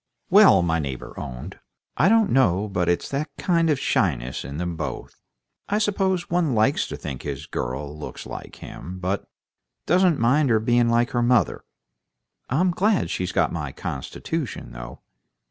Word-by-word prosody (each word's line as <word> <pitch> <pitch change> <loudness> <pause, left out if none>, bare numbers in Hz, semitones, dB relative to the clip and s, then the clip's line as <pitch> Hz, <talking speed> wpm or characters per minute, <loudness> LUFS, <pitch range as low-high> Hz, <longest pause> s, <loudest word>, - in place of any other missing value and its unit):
"Well," 195 - +7
my 80 -1 +1
neighbor 70 -4 -5
owned, 60 -1 -7 0.4
"I 160 +9 +4
don't 225 -2 +4
know 105 -6 +3
but 90 -4 0
it's 85 - 0
that 140 +3 -2
kind 170 -2 +2
of 145 -4 +2
shyness 70 - 0
in 70 +3 -6
them 85 0 -3
both. 80 - -6 0.5
I 205 - +2
suppose 195 -4 0
one 170 -7 +1
likes 110 +6 +2
to - - -6
think 65 - -6
his 70 0 -5
girl 70 +4 -4
looks 75 - -8
like - - -8
him, 90 +4 -9
but 95 +2 -2 0.6
doesn't 180 -2 +4
mind 130 +5 +3
her 110 -2 +4
being 120 +1 +2
like 120 +3 +2
her 120 - +1
mother. 120 0 +2 0.9
I'm 175 +8 +2
glad 200 +3 +1
she's 90 -1 -2
got - - +1
my - - -3
constitution, 160 -7 -5
though. - - -9
120 Hz, 165 wpm, -24 LUFS, -, 0.9 s, Well